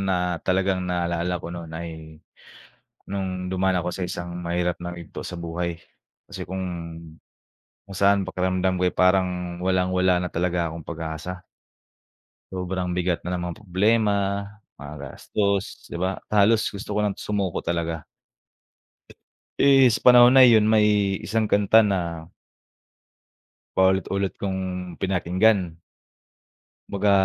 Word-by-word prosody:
na 95 -2 0 0.3
talagang 95 0 +1
naalala 85 0 -1
ko - - -6
nun 85 -2 -8
ay 80 -2 -8 0.9
nung 95 -2 -3
dumaan 95 0 +1
ako 85 - -3
sa 90 +1 -3
isang 85 0 -5 0.2
mahirap 85 0 -1
na 85 0 -6
yugto 85 -2 -9
sa - - -6
buhay. 85 0 -4 0.5
Kasi - - -6
kung 95 +1 -5 1.3
kung 95 - -8
saan 100 0 +3
pakiramdam 95 0 0
ko 90 - 0
ay 90 - +2
parang 90 -1 +1
walang-wala 90 -1 +2
na 90 - -2
talaga 85 0 -1
akong 80 0 -8
pag-asa. 85 +2 -6 1.1
Sobrang 90 -1 -3
bigat 90 -1 -1
na 90 - -2
ng 90 - -3
mga 85 - -8
problema, 105 +2 +2 0.6
mga 75 +1 -8
gastos 100 +8 -2
,'di 85 - -5
ba? 95 +2 -1 0.2
Halos 105 +2 +3
gusto 100 0 -6
ko 105 - +1
ng 105 -2 -1
sumuko 100 -4 -2
talaga. 85 -2 -3 1.5
Eh, 135 -2 +6
sa 110 - -1
panahon 125 +1 +8
na 130 - +10
yun 110 -3 +6
may 105 -2 +3
isang 110 +1 0
kanta 105 +2 +5
na 85 -6 -1 1.5
paulit-ulit 95 +1 +2
kong 95 -1 -2 0.4
pinakinggan. 95 -1 +1 1.1
Kumbaga, 100 +1 +1
90 Hz, 130 wpm, -24 LUFS, 85-100 Hz, 1.5 s, na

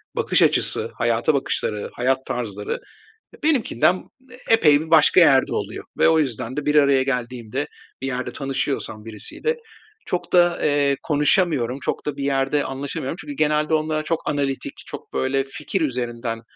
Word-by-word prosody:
bakış - - +1
açısı, - - +2
hayata 115 +5 +1
bakışları, 110 -6 -2
hayat 130 +2 0
tarzları 105 -4 -4 0.6
ya - - -16
benimkinden 185 - +2 0.5
epey 155 -10 +6
bir 160 0 -8
başka 160 +2 +6
yerde 135 -6 +5
oluyor. - - -4
Ve - - +5
o 160 -1 +4
yüzden 130 -3 -2
de 150 - -2
bir 150 - +1
araya 140 -2 +5
geldiğimde, 125 0 -3 0.3
bir 135 - -3
yerde 130 -1 -3
tanışıyorsam 135 -5 -3
birisiyle 115 - -3 0.5
çok 180 - -3
da, 175 -1 +4
eee, 145 -1 +2
konuşamıyorum, 145 -4 +1
çok - - -3
da 150 -1 -3
bir 140 - -3
yerde 140 +1 +1
anlaşamıyorum 135 +2 -4
çünkü 290 - -7
genelde 150 - +1
onlara 155 0 0
çok 165 +1 -1
analitik, 140 -2 -2
çok - - -10
böyle 135 +1 0
fikir 150 +7 -4
üzerinden, 120 -4 -2
140 Hz, 150 wpm, -22 LUFS, 125-155 Hz, 0.6 s, epey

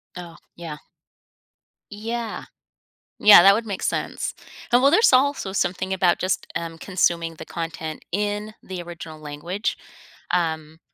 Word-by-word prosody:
Oh, 175 -2 -9 0.2
yeah. 165 -3 -7 1.1
Yeah, 225 +2 -4 0.8
yeah 205 -4 +9
that 195 +1 +8
would 225 +2 -2
make 200 -3 -5
sense, - - -2 0.4
and 245 +1 +5
well, 275 - +5
there's 355 - +5
also 260 -7 +2
something 185 0 -1
about 180 -2 +2
just, 185 0 -1
um, 165 -1 -4
consuming 170 -2 0
the - - -9
content 165 -2 -6
in 210 +2 -2
the 185 -2 -6
original 170 -2 -9
language, 155 +7 -4 0.5
um 160 -2 -1
180 Hz, 130 wpm, -23 LUFS, 165-210 Hz, 1.1 s, yeah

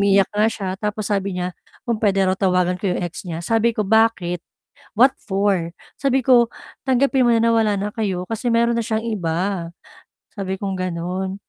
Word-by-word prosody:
umiiyak 200 -1 +4
nga 210 +1 +3
siya 200 -4 -4
tapos 210 -1 -2
sabi 195 -2 -1
niya 180 0 -2 0.3
kung 235 -3 -1
puwede 195 -2 +3
raw 185 - +2
tawagan 180 -2 +2
ko 200 - -1
'yong 180 - -1
ex 175 +2 -6
niya, 165 -1 -4
sabi 225 +2 +2
ko, 215 - +1
"Bakit? 200 -5 +2 0.6
What 260 +4 +6
for?" 195 -4 0 0.3
Sabi 270 -1 +2
ko, 240 -2 +5 0.4
"Tanggapin 265 0 +3
mo - - +5
na - - +2
na 230 - +4
wala 215 -2 +2
na 205 - -1
kayo 190 -5 -2
kasi 225 +2 -2
mayro'n 235 +1 +3
na - - +1
siyang 220 0 -2
iba." 185 -3 -2 0.7
Sabi 190 -2 -3
kong 195 -1 -3
gano'n. 185 +2 -3
200 Hz, 190 wpm, -21 LUFS, 185-225 Hz, 0.7 s, What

